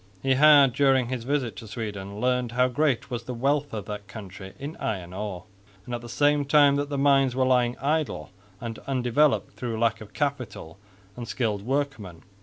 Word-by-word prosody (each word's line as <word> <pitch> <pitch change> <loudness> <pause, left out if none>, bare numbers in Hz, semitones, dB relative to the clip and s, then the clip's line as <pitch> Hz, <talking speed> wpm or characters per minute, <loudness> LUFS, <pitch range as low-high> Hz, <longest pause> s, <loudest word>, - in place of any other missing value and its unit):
He 135 - +3
had, 140 -2 +6
during 135 -3 +3
his 125 -3 -4
visit 135 -4 -1
to 110 - -9
Sweden, 100 -2 -6
learnt 125 0 0
how 125 +1 +3
great 135 -1 0
was 120 -1 -4
the 125 - -5
wealth 140 +4 0
of 105 -3 -5
that 105 -1 -7
country 95 -3 -10
in 145 +4 -6
iron 90 -5 -4
ore, 95 -2 -5 0.4
and 125 - -7
at 120 - -3
the 120 - -10
same 145 +3 +2
time 140 0 +5
that 145 0 -2
the 140 - -2
mines 135 -2 +3
were 130 0 +2
lying 125 -1 +2
idle 145 - -2 0.3
and 115 -1 -6
undeveloped 135 +2 +1
through 115 -3 -4
lack 115 -1 +1
of 105 -1 -12
capital 125 - -4 0.4
and 120 -1 -7
skilled 110 -5 -1
workmen. 115 - -3
125 Hz, 190 wpm, -26 LUFS, 110-140 Hz, 0.4 s, had